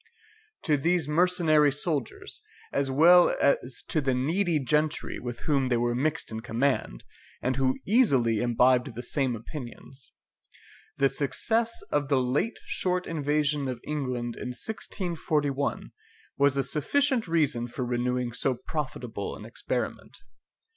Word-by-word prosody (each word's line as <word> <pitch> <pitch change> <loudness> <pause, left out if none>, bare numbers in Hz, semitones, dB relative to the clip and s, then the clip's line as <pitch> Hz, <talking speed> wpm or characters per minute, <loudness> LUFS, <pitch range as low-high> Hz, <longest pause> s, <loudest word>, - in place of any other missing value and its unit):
To 155 -5 +2
these 165 +1 +1
mercenary 155 -2 +3
soldiers, 145 -2 -3 0.3
as 140 -1 0
well 170 +6 +6
as 130 -2 +1
to 155 - +1
the 135 -2 +1
needy 165 +6 +1
gentry 150 +2 0
with 120 -1 -6
whom 135 -4 +1
they 120 - +2
were 120 0 +1
mixed 150 +4 -1
in 110 - -4
command, 115 - -1 0.4
and 130 +1 -1
who 130 0 +1
easily 135 - +3
imbibed 125 +1 +2
the 120 - -5
same 130 -1 -1
opinions, 130 +2 -9 0.9
the 140 - +4
success 225 - 0
of 145 -1 +1
the 135 -1 +2
late 130 - 0
short 180 -1 -1
invasion 150 -2 0
of 125 -2 -4
England 125 -5 -3
in 125 -1 -6
1641 155 - -2 0.4
was 140 0 +3
a 135 - +2
sufficient 235 - +1
reason 145 -8 +1
for 125 +1 -4
renewing 125 0 -1
so 130 +1 0
profitable 150 +3 -5
an - - -10
experiment. - - -4
140 Hz, 135 wpm, -27 LUFS, 125-155 Hz, 0.9 s, well